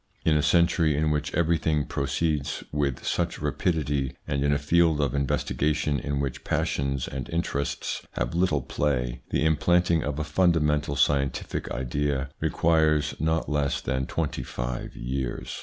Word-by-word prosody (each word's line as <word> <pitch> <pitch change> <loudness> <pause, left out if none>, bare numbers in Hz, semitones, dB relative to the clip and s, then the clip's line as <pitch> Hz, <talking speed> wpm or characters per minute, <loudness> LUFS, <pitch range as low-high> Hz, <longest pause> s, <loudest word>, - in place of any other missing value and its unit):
In 80 - +4
a 75 - +3
century 80 0 +3
in 75 0 +2
which 75 0 -1
everything 80 -3 +1
proceeds 75 +2 -1
with 70 -4 -1
such - - 0
rapidity, 70 -6 -1
and 70 0 0
in 70 - +2
a 75 - +3
field 80 +1 +3
of 70 -4 +1
investigation 70 +1 0
in 70 -1 -2
which 70 -3 -3
passions 70 -2 -1
and 65 -2 -5
interests 80 -4 -2
have - - -2
little 85 -5 +2
play, 60 -5 -1
the 70 - +1
implanting 85 +1 +3
of 75 -1 -3
a 75 - -1
fundamental 75 -3 +2
scientific 70 0 0
idea 65 +2 -1
requires 80 -2 +2
not 80 +1 0
less 75 -1 0
than 65 +1 -2
twenty 80 -6 -2
five - - -5
years. 65 0 -4
75 Hz, 145 wpm, -26 LUFS, 70-80 Hz, -, In